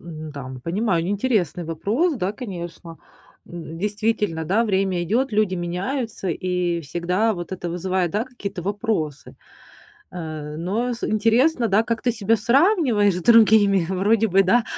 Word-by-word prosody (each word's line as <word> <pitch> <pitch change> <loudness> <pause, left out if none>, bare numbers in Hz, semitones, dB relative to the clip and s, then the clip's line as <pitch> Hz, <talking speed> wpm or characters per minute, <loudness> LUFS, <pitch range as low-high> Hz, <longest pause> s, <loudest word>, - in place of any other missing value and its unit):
М-да. 155 -5 -8
Понимаю 180 -2 0
интересный 200 - 0
вопрос, 220 - 0
да, 195 -1 -2
конечно. 175 -7 -8 0.5
М, 165 -1 -8
действительно, 210 -4 -1
да, 215 +8 +2
время 190 -3 0
идет, 230 +8 0
люди 205 -3 +1
меняются, 195 +5 -3
и 180 0 -1
всегда 175 +8 0
вот 175 +1 -7
это 175 -2 -4
вызывает, 180 0 -1
да, 215 +6 -1
какие-то 200 -8 -7
вопросы, 200 - -3 0.8
э, 155 -3 -6
но 215 +9 -1
с 230 - -6
интересно, 230 +4 +2
да, 205 +3 +3
как 230 0 -2
ты 245 - +2
себя 225 0 +1
сравниваешь 235 - +3
с 180 - -4
другими. 210 -4 +5
Вроде 205 +4 +2
бы, 195 +1 +4
да, 230 +5 +3
195 Hz, 140 wpm, -22 LUFS, 175-225 Hz, 0.8 s, другими